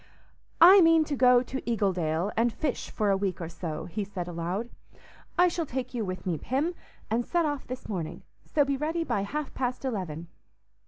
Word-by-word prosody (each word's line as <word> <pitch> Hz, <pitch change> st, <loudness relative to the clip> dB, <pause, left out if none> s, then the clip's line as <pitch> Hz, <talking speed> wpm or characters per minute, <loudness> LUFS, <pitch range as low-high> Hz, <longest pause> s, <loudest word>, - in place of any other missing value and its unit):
"I 370 Hz, +4 st, +9 dB
mean 330 Hz, -1 st, +6 dB
to 300 Hz, -1 st, -3 dB
go 250 Hz, -1 st, +5 dB
to 265 Hz, +1 st, -5 dB
Eagledale 185 Hz, -5 st, 0 dB
and 230 Hz, +1 st, +2 dB
fish 285 Hz, +2 st, -3 dB
for 210 Hz, -2 st, 0 dB
a -, -, +4 dB
week 195 Hz, -2 st, -2 dB
or 165 Hz, -2 st, -5 dB
so," 165 Hz, -2 st, -5 dB
he 205 Hz, +4 st, -3 dB
said 190 Hz, -3 st, -5 dB
aloud. 175 Hz, +7 st, -3 dB, 0.7 s
"I 360 Hz, +1 st, +6 dB
shall 340 Hz, -2 st, -2 dB
take 255 Hz, 0 st, -4 dB
you 235 Hz, -3 st, -1 dB
with 185 Hz, -2 st, -5 dB
me, 170 Hz, -5 st, -1 dB
Pym, 290 Hz, +7 st, -1 dB, 0.4 s
and 235 Hz, +2 st, +2 dB
set 345 Hz, +5 st, +1 dB
off 290 Hz, -3 st, -3 dB
this 255 Hz, +1 st, -6 dB
morning; 170 Hz, -5 st, -4 dB, 0.2 s
so 290 Hz, -2 st, +2 dB
be 275 Hz, 0 st, 0 dB
ready 320 Hz, +4 st, -1 dB
by 205 Hz, -, -1 dB
half 290 Hz, +8 st, -4 dB
past 255 Hz, 0 st, -2 dB
eleven." 175 Hz, -, -3 dB
235 Hz, 195 wpm, -28 LUFS, 185-285 Hz, 0.7 s, I